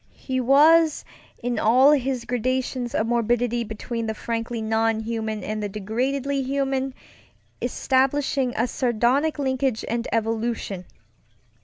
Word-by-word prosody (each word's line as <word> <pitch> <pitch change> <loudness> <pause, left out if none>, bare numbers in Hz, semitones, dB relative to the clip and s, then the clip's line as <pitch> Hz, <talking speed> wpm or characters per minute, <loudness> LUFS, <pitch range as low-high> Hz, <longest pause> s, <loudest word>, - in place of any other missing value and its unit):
He 260 -1 -3
was, 305 +5 +5 0.4
in 245 -2 -1
all 255 +6 +5
his 265 -4 0
gradations 250 0 -2
of 220 - +1
morbidity 240 0 +1
between 225 +1 -5
the 220 - -2
frankly 230 +1 -3
non 220 0 +1
human 220 -2 -3
and 215 +2 -3
the 205 - -2
degradedly 255 +7 -1
human, 270 0 -1 0.7
establishing 270 0 +1
a 230 - +1
sardonic 250 +5 +1
linkage 260 -4 -1
and 235 0 -2
evolution. 225 -4 -2
240 Hz, 120 wpm, -24 LUFS, 225-265 Hz, 0.7 s, was